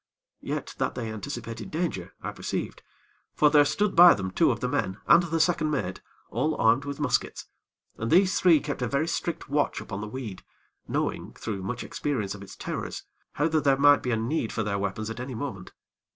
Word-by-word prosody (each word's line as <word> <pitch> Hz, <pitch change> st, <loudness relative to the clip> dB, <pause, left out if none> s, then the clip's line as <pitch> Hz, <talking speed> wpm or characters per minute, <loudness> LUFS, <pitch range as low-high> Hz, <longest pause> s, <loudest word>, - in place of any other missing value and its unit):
Yet -, -, -4 dB
that -, -, -1 dB
they 115 Hz, -3 st, -4 dB
anticipated 115 Hz, 0 st, -6 dB
danger, 155 Hz, -, -3 dB
I -, -, -3 dB
perceived; -, -, -4 dB, 0.5 s
for 150 Hz, -1 st, +4 dB
there 145 Hz, -1 st, +7 dB
stood 205 Hz, +7 st, 0 dB
by 175 Hz, +1 st, +9 dB
them 95 Hz, -2 st, -4 dB
two -, -, +3 dB
of -, -, 0 dB
the -, -, -1 dB
men 95 Hz, -, -1 dB
and 170 Hz, -, +7 dB
the 165 Hz, -1 st, -1 dB
second 160 Hz, -1 st, +2 dB
mate, 110 Hz, -11 st, -2 dB, 0.3 s
all 155 Hz, 0 st, 0 dB
armed 115 Hz, +5 st, +3 dB
with 140 Hz, 0 st, -5 dB
muskets, 140 Hz, -4 st, -1 dB, 0.5 s
and 115 Hz, -, -2 dB
these 185 Hz, +3 st, +4 dB
three 170 Hz, -5 st, +5 dB
kept 145 Hz, -3 st, -4 dB
a 125 Hz, -, 0 dB
very 140 Hz, +6 st, 0 dB
strict 170 Hz, -1 st, -3 dB
watch 145 Hz, +1 st, 0 dB
upon 100 Hz, -1 st, -6 dB
the 110 Hz, -, -5 dB
weed, 110 Hz, -5 st, -7 dB, 0.4 s
knowing, -, -, -2 dB
through 100 Hz, -3 st, -5 dB
much 110 Hz, +6 st, -4 dB
experience 110 Hz, -10 st, -2 dB
of 105 Hz, -, -10 dB
its 100 Hz, -, -10 dB
terrors, -, -, -5 dB, 0.3 s
how 150 Hz, -, +1 dB
that 155 Hz, -1 st, +1 dB
there 135 Hz, -1 st, +4 dB
might 145 Hz, 0 st, +6 dB
be 125 Hz, -, -3 dB
a 115 Hz, -, +1 dB
need 115 Hz, +1 st, -1 dB
for 110 Hz, -, -1 dB
their 100 Hz, -1 st, -1 dB
weapons 105 Hz, +2 st, -3 dB
at 115 Hz, -, -7 dB
any 125 Hz, 0 st, -5 dB
moment. 110 Hz, -7 st, -6 dB
135 Hz, 205 wpm, -27 LUFS, 110-155 Hz, 0.5 s, by